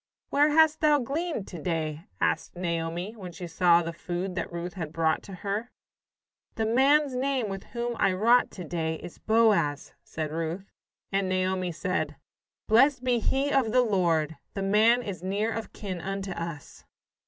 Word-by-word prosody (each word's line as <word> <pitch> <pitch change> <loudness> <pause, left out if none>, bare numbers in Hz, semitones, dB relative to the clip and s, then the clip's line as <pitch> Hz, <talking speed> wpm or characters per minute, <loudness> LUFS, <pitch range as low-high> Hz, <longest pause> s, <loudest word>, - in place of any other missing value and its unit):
"Where 290 +2 +4
hast 315 0 +4
thou 300 -1 +5
gleaned 285 - -3
to 170 -4 -8
day?" 160 -2 -2
asked 80 - 0
Naomi, 170 +3 -3
when 185 -5 -8
she 175 +1 -7
saw 170 0 +4
the 165 0 -4
food 175 +2 -4
that 175 -2 -4
Ruth 175 +1 -5
had 165 -5 -5
brought 160 -1 +1
to 200 - -12
her. 210 +5 -2 0.9
"The 220 - 0
man's 270 +5 +4
name 260 -3 0
with 195 0 -6
whom 240 0 -3
I 195 - +4
wrought 235 +6 +4
to 180 - -8
day 160 -1 -2
is 170 - -10
Boaz," 215 -10 +2
said 155 -1 -4
Ruth. 165 +4 -4 0.4
And 195 -1 0
Naomi 185 -1 0
said: 160 -3 -2 0.5
"Blessed 255 +4 +4
be 250 -2 +2
he 275 +5 0
of 260 -6 +2
the 250 +1 +4
Lord 165 -8 +1 0.2
the 195 - -2
man 220 +5 +4
is 190 -6 -6
near 200 +4 -1
of 225 -1 -5
kin 185 -4 -6
unto 195 +1 -4
us." 165 -4 -7
195 Hz, 170 wpm, -27 LUFS, 170-235 Hz, 0.9 s, thou